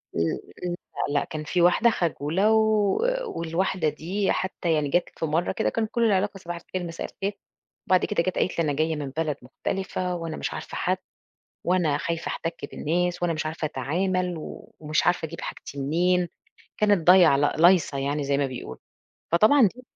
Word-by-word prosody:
امم 85 Hz, 0 st, +1 dB, 0.3 s
م 175 Hz, -1 st, -1 dB, 0.3 s
لأ 145 Hz, 0 st, +2 dB
لأ -, -, -2 dB
كان 155 Hz, -1 st, -5 dB
في 175 Hz, +3 st, 0 dB
واحدة 180 Hz, +7 st, +5 dB
خجولة 175 Hz, +1 st, +1 dB
و 215 Hz, -2 st, +3 dB, 0.3 s
والواحدة 170 Hz, -, -1 dB
دي 185 Hz, +7 st, -1 dB
حتى 180 Hz, -3 st, -1 dB
يعني 150 Hz, -2 st, +1 dB
جات 175 Hz, +5 st, +1 dB
في -, -, 0 dB
مرة 160 Hz, +3 st, 0 dB
كده 220 Hz, -, 0 dB
كان 225 Hz, -1 st, -1 dB
كل 235 Hz, +1 st, -1 dB
العلاقة 200 Hz, -1 st, +1 dB
صباح 175 Hz, -2 st, -6 dB
الخير، 175 Hz, +1 st, -5 dB
مساء 165 Hz, -, -5 dB
الخير، 200 Hz, +1 st, -4 dB, 0.5 s
وبعد 185 Hz, -1 st, +4 dB
كده 185 Hz, -5 st, 0 dB
جات 185 Hz, -, -2 dB
قالت 175 Hz, -, 0 dB
لي: -, -, +3 dB
"أنا 145 Hz, -2 st, 0 dB
جاية 155 Hz, +2 st, 0 dB
من 145 Hz, -2 st, -4 dB
بلد 150 Hz, 0 st, -2 dB
مختلفة 180 Hz, +7 st, -3 dB
وأنا 165 Hz, -2 st, -5 dB
مش -, -, -3 dB
عارفة -, -, -7 dB
حد -, -, +1 dB, 0.7 s
وأنا 175 Hz, -5 st, +2 dB
خايفة 170 Hz, -1 st, -3 dB
أحتك 165 Hz, 0 st, -3 dB, 0.2 s
بالناس 175 Hz, +3 st, -1 dB
وأنا 170 Hz, -1 st, +2 dB
مش 155 Hz, 0 st, -3 dB
عارفة 160 Hz, +1 st, -4 dB
أتعامل 180 Hz, +6 st, -1 dB
و 155 Hz, -, -9 dB
ومش 155 Hz, 0 st, 0 dB
عارفة 175 Hz, -2 st, +2 dB
أجيب 165 Hz, +1 st, -8 dB
حاجتي 140 Hz, -, -7 dB
منين." 175 Hz, +5 st, +2 dB, 0.5 s
كانت 205 Hz, -6 st, +2 dB
ضايعة 180 Hz, -6 st, +7 dB
لأ 145 Hz, +1 st, +1 dB
لايصة 170 Hz, -4 st, +5 dB
يعني 140 Hz, +2 st, -1 dB
زي 140 Hz, 0 st, +1 dB
ما 140 Hz, -, +2 dB
بيقولوا، 130 Hz, -1 st, -7 dB, 0.5 s
فطبعًا 215 Hz, +6 st, +6 dB
دي 250 Hz, -, -13 dB
170 Hz, 185 wpm, -25 LUFS, 155-185 Hz, 0.7 s, ضايعة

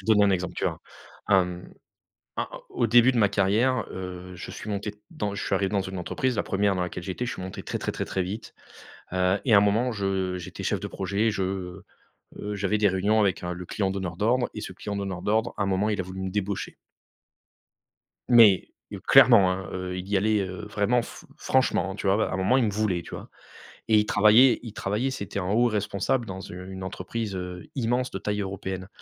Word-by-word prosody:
te -, -, -15 dB
donner 105 Hz, -1 st, +5 dB
un -, -, +3 dB
exemple, 90 Hz, -2 st, -1 dB
tu -, -, -3 dB
verras. -, -, -1 dB, 0.5 s
A 95 Hz, -2 st, +5 dB, 0.9 s
a -, -, -2 dB, 0.2 s
au 120 Hz, -, 0 dB
début 120 Hz, +3 st, +6 dB
de -, -, -1 dB
ma 105 Hz, -3 st, +4 dB
carrière, 105 Hz, +5 st, +2 dB
heu, 90 Hz, 0 st, -7 dB
je -, -, -8 dB
suis -, -, -7 dB
monté 105 Hz, 0 st, -3 dB, 0.2 s
dans 105 Hz, -, -3 dB
je 100 Hz, -, -4 dB
suis -, -, 0 dB
arrivé 95 Hz, 0 st, 0 dB
dans 100 Hz, -1 st, +1 dB
une 95 Hz, 0 st, -6 dB
entreprise, 130 Hz, -, -1 dB
la 100 Hz, -, 0 dB
1re 100 Hz, 0 st, +1 dB
dans 90 Hz, -, -1 dB
laquelle 90 Hz, 0 st, -5 dB
j'étais, 95 Hz, +7 st, -3 dB
je 125 Hz, -, -3 dB
suis -, -, -6 dB
monté 95 Hz, 0 st, -7 dB
très, -, -, -4 dB
très, -, -, -2 dB
très, -, -, -4 dB
très 95 Hz, -, -2 dB
vite, 100 Hz, +5 st, -5 dB, 0.6 s
heu 95 Hz, +2 st, +2 dB
et 115 Hz, -, +3 dB
à -, -, +9 dB
un -, -, +8 dB
moment, 110 Hz, +5 st, +2 dB
je 95 Hz, -3 st, -1 dB
j'étais 90 Hz, -, -8 dB
chef -, -, 0 dB
de -, -, -5 dB
projet, 100 Hz, +3 st, 0 dB
je, 95 Hz, -2 st, -3 dB, 0.6 s
heu, 105 Hz, 0 st, -4 dB
j'avais 100 Hz, +1 st, 0 dB
des 105 Hz, -1 st, +4 dB
réunions 100 Hz, +4 st, +2 dB
avec 100 Hz, -3 st, +1 dB
un 90 Hz, 0 st, -2 dB
le 90 Hz, +1 st, -7 dB
client 95 Hz, +1 st, -1 dB
donneur 95 Hz, -3 st, -4 dB
d'ordre 120 Hz, +4 st, +2 dB
et -, -, -6 dB
ce -, -, -6 dB
client 100 Hz, -1 st, -5 dB
donneur 95 Hz, -3 st, -4 dB
d'ordre, 110 Hz, +3 st, +1 dB
un 100 Hz, -, 0 dB
moment, 100 Hz, +2 st, +1 dB
il 105 Hz, -3 st, -1 dB
a -, -, 0 dB
voulu 95 Hz, +1 st, -7 dB
me 95 Hz, -, -2 dB
débaucher. 100 Hz, 0 st, -3 dB, 1.5 s
Mais 115 Hz, -6 st, +7 dB, 0.2 s
heu, -, -, -6 dB
clairement, 100 Hz, -7 st, +7 dB
hein, 95 Hz, +1 st, -4 dB
heu, 90 Hz, 0 st, -4 dB
il 90 Hz, +1 st, -6 dB
y 100 Hz, 0 st, +1 dB
allait, 105 Hz, +1 st, +2 dB
heu, 95 Hz, +1 st, -5 dB
vraiment 105 Hz, +4 st, +2 dB
fr -, -, -11 dB
franchement, 130 Hz, -6 st, +1 dB
hein, 95 Hz, -, -6 dB
tu 100 Hz, -, -3 dB
vois? 95 Hz, +1 st, +4 dB
Bah, 110 Hz, -, +1 dB
à -, -, -4 dB
un -, -, -1 dB
moment, 95 Hz, +7 st, +3 dB
il 125 Hz, -, +3 dB
me -, -, +1 dB
voulait, 100 Hz, -4 st, 0 dB
tu -, -, -12 dB
vois? -, -, -9 dB, 0.6 s
Et 110 Hz, -, +5 dB
il 105 Hz, -, +1 dB
travaillait 110 Hz, +5 st, +6 dB
il 115 Hz, -3 st, -8 dB
travaillait, 105 Hz, +8 st, -1 dB
c'était 100 Hz, -6 st, -4 dB
un 90 Hz, -1 st, -3 dB
haut 120 Hz, +4 st, +4 dB
responsable 110 Hz, +3 st, -1 dB
dans 95 Hz, -3 st, -6 dB
u 90 Hz, 0 st, -9 dB
une 95 Hz, 0 st, -7 dB
entreprise, 100 Hz, +3 st, -4 dB
heu, 90 Hz, -1 st, -6 dB
immense, 125 Hz, 0 st, 0 dB
de -, -, -3 dB
taille 105 Hz, +1 st, -2 dB
européenne. 95 Hz, -1 st, -5 dB
100 Hz, 230 wpm, -26 LUFS, 95-110 Hz, 1.5 s, à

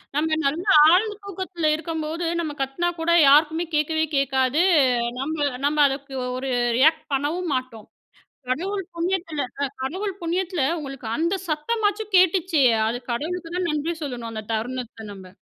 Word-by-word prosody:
நம்ம 315 Hz, +1 st, +1 dB
நல்ல 310 Hz, +6 st, 0 dB, 0.3 s
ஆழ்ந்த 415 Hz, +4 st, +3 dB
தூக்கத்தில 370 Hz, -5 st, -2 dB
இருக்கும்போது 320 Hz, +1 st, -4 dB
நம்ம 315 Hz, -3 st, -2 dB
கத்துனா 270 Hz, +6 st, -1 dB
கூட, 335 Hz, +1 st, 0 dB, 0.2 s
யாருக்குமே 315 Hz, +4 st, +4 dB
கேட்கவே 315 Hz, +1 st, +1 dB
கேட்காது. 270 Hz, +2 st, +2 dB, 0.6 s
நம்ம 310 Hz, +4 st, -2 dB, 0.3 s
நம்ம 300 Hz, +1 st, +1 dB
அதுக்கு 275 Hz, 0 st, -5 dB, 0.2 s
ஒரு 265 Hz, +1 st, -4 dB, 0.3 s
ரியாக்ட் 315 Hz, +3 st, +4 dB
பண்ணவும் 310 Hz, +6 st, -1 dB
மாட்டோம். 255 Hz, -4 st, -5 dB, 0.6 s
கடவுள் 380 Hz, +8 st, -2 dB
புண்ணியத்துல 335 Hz, -3 st, -2 dB, 0.2 s
அ -, -, +3 dB, 0.2 s
கடவுள் 375 Hz, +8 st, -3 dB
புண்ணியத்துல 350 Hz, -1 st, -1 dB, 0.2 s
உங்களுக்கு 270 Hz, -6 st, -7 dB
அந்த 335 Hz, +5 st, 0 dB
சத்தமாச்சும் 415 Hz, +6 st, -1 dB
கேட்டுச்சே. 360 Hz, -5 st, +3 dB, 0.2 s
அது 245 Hz, +2 st, -3 dB
கடவுளுக்கு 330 Hz, +6 st, -4 dB
தான் 360 Hz, -2 st, -1 dB
நன்றி 305 Hz, +3 st, -1 dB
சொல்லணும் 240 Hz, -5 st, -5 dB
அந்த 215 Hz, -1 st, -6 dB
தருணத்த 230 Hz, -1 st, -5 dB
நம்ப. 190 Hz, -2 st, -12 dB
315 Hz, 135 wpm, -23 LUFS, 270-350 Hz, 0.6 s, யாருக்குமே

